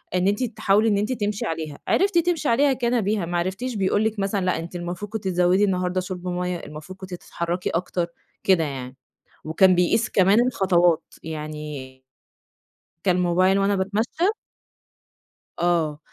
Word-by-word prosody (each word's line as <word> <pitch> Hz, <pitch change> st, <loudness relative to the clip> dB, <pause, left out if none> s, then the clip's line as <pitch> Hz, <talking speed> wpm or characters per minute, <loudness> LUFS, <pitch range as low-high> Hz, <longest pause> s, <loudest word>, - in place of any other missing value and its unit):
إن 180 Hz, +1 st, +2 dB
أنتِ 205 Hz, +5 st, +1 dB
تحاولي 215 Hz, -2 st, +2 dB
إن 205 Hz, -, +2 dB
أنتِ 210 Hz, +4 st, -1 dB
تمشي 210 Hz, -3 st, -2 dB
عليها، 160 Hz, -3 st, -4 dB
عرفتِ 390 Hz, -2 st, +2 dB
تمشي 335 Hz, -4 st, +1 dB
عليها 275 Hz, +4 st, +4 dB
كان 240 Hz, -1 st, 0 dB
بها، 205 Hz, -2 st, 0 dB
ما 175 Hz, +1 st, -2 dB
عرفتيش 195 Hz, +8 st, -2 dB
بيقول 205 Hz, +1 st, +1 dB
لِك 220 Hz, -1 st, -1 dB
مثلًا 195 Hz, -1 st, 0 dB
لأ، 185 Hz, -, +1 dB
أنتِ 170 Hz, +2 st, -8 dB
المفروض 175 Hz, +4 st, -5 dB
كنتِ 220 Hz, -2 st, -4 dB
تزودي 180 Hz, +2 st, +3 dB
النهاردة 185 Hz, -1 st, 0 dB
شُرب 185 Hz, 0 st, -6 dB
ميَّة 180 Hz, 0 st, -2 dB
المفروض 155 Hz, +5 st, -10 dB
كنتِ 185 Hz, -1 st, -8 dB
تتحركي 175 Hz, 0 st, -3 dB
أكتر، 175 Hz, 0 st, -1 dB, 0.4 s
كده 185 Hz, -4 st, +4 dB
يعني، 130 Hz, -3 st, -5 dB, 0.5 s
وكان 185 Hz, +4 st, +4 dB
بيقيس 180 Hz, +6 st, +2 dB
كمان 205 Hz, +5 st, +4 dB
الخطوات 175 Hz, -7 st, +3 dB, 0.2 s
يعني 150 Hz, -4 st, -7 dB, 1.0 s
كان 180 Hz, -2 st, +2 dB
موبايل 185 Hz, +3 st, +3 dB
وأنا 200 Hz, +1 st, +2 dB
باتمشي 220 Hz, -, 0 dB, 1.3 s
آه، 165 Hz, -4 st, +1 dB
185 Hz, 155 wpm, -23 LUFS, 175-210 Hz, 1.3 s, عليها